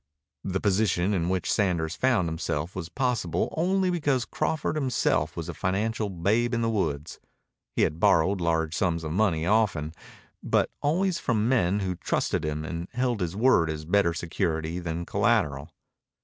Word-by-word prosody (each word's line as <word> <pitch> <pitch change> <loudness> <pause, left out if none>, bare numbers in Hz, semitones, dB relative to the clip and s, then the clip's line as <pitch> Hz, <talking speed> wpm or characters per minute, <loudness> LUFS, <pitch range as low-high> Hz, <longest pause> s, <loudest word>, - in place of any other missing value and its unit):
The 95 0 -2
position 100 -2 +1
in 85 -3 0
which 95 -1 0
Sanders 85 -6 0
found 125 -9 +2
himself 80 0 -3
was 90 -3 -5
possible 120 - -1
only 185 +3 +1
because 145 -8 0
Crawford 160 - -1
was 155 - -1
himself 130 -3 0
a - - -4
financial 105 +3 -1
babe 105 +7 +1
in 115 - 0
the 115 - +1
woods. 75 -8 -2 0.6
He - - +3
had 80 - 0
borrowed 95 -1 +3
large 80 -1 0
sums 85 -2 0
of 80 - -4
money 85 -4 +1
often, 95 -7 +1 0.5
but - - +1
always 170 +4 +1
from 110 -3 0
men 105 -6 +2
who 95 -1 -1
trusted 85 - -1
him 75 0 -3
and 85 +1 -5
held 125 -2 0
his 90 0 -2
word 105 -8 +4
as 75 -1 -4
better 90 +1 +3
security 85 -1 -2
than 85 0 -4
collateral. 70 -1 +1
95 Hz, 165 wpm, -27 LUFS, 85-115 Hz, 0.6 s, word